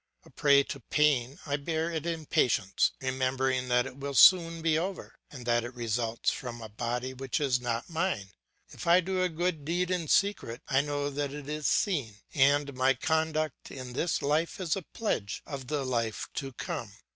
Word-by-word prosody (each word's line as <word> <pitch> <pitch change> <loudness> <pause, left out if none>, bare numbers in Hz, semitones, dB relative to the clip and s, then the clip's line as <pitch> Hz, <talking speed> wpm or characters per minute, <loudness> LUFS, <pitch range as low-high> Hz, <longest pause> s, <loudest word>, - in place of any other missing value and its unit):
A - - -17
prey 140 -1 +5
to 140 - -6
pain, 140 -1 +1
I 145 -1 0
bear 160 +3 -2
it 160 0 -3
in 165 -2 -3
patience, 100 -8 +2
remembering 130 0 0
that 125 0 +3
it 135 0 -8
will 140 0 -5
soon 165 +1 +6
be 160 -2 +3
over, 185 +4 -4
and 125 -4 -10
that 120 -1 +2
it 120 +1 -7
results 115 -1 -1
from 120 -2 -6
a 110 -1 -8
body 120 +4 -3
which 135 +3 -2
is 130 -4 +1
not 120 -1 -2
mine. 165 - -1 0.4
If 180 - -8
I 170 +2 +7
do 185 +1 -1
a 185 - +2
good 165 -2 -1
deed 175 +4 -1
in 175 -3 -1
secret, 200 - +1
I 135 0 +3
know 145 0 -2
that 140 0 -2
it 145 -1 -7
is 150 0 -2
seen, 140 - +1 0.2
and 140 +1 +3
my 130 +1 +3
conduct 155 +1 -1
in 130 -2 -8
this 165 +6 -1
life 155 +9 0
is 175 -4 0
a 195 - -3
pledge 150 - -3
of 135 -4 -6
the 145 -1 -1
life 115 -4 -1
to 135 -1 -4
come. 110 -3 -5
140 Hz, 190 wpm, -29 LUFS, 125-160 Hz, 0.4 s, I